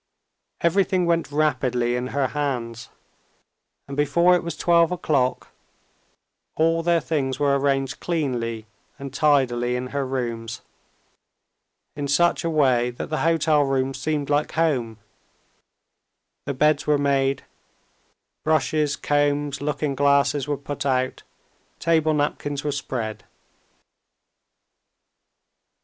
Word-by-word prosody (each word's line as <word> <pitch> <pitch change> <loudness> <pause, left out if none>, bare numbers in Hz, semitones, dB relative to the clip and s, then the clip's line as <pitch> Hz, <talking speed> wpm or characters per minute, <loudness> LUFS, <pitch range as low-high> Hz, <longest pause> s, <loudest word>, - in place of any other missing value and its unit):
Everything 185 +1 +2
went 165 -3 0
rapidly 125 -5 +1
in 125 +1 -2
her 135 -1 -1
hands, 125 -6 -3 1.0
and 140 - -6
before 170 +5 +3
it 180 - +3
was 170 -2 -5
twelve 170 0 +3
o'clock 140 -7 0 1.1
all 165 +1 +2
their 170 0 +2
things 135 -5 -2
were 140 -1 +3
arranged 135 -1 0
cleanly 120 -9 -2 0.3
and 140 -2 -8
tidily 125 -5 +2
in 125 +1 -3
her 140 -1 0
rooms, 120 -3 -4 1.3
in 145 -1 -3
such 175 +6 +2
a 165 - 0
way 130 -6 +2
that 120 +5 -7
the 155 - 0
hotel 160 -2 +3
rooms 135 -1 -1
seemed 150 -2 -1
like 145 +1 0
home: 130 -9 0 1.5
the 140 - -1
beds 150 +2 +2
were 150 -1 +4
made, 140 -1 +1 1.0
brushes, 155 -1 +1
combs, 145 -1 0
looking 145 0 -1
glasses 140 0 +2
were 145 -1 -1
put 140 0 -5
out, 130 -2 0 0.6
table 160 -2 +2
napkins 145 -1 -2
were 150 - -1
spread. 120 -6 -4
145 Hz, 115 wpm, -23 LUFS, 130-155 Hz, 1.5 s, were